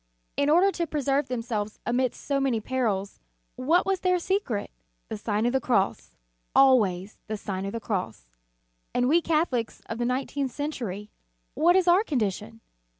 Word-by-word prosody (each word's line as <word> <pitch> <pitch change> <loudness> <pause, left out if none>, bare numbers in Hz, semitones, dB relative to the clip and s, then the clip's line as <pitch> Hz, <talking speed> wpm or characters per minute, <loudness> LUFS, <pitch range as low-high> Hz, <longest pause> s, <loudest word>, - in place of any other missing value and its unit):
In 285 +1 +1
order 360 +6 +5
to 340 -3 -2
preserve 285 -1 0
themselves 225 -4 -3
amidst 245 0 0
so 280 -1 +1
many 265 -4 +1
perils, 215 -5 -2 0.4
what 325 +8 +2
was 390 -1 0
their 365 0 +2
secret? 350 - -1 0.4
The 220 - -4
Sign 210 +1 -1
of 240 - +1
the 265 - +2
Cross, 190 - 0 0.4
always 215 -8 +4
the 215 0 -3
Sign 195 -1 -4
of - - -3
the 230 - -4
Cross. 185 - -3 0.7
And 245 0 +2
we 330 +5 +4
Catholics 305 -9 0
of 225 - -6
the 240 - 0
nineteenth 265 +2 -1
century, 230 -8 -4 0.4
what 345 +3 +4
is 375 -1 +3
our 355 +4 +6
condition? 225 - -2
250 Hz, 160 wpm, -26 LUFS, 210-295 Hz, 0.7 s, our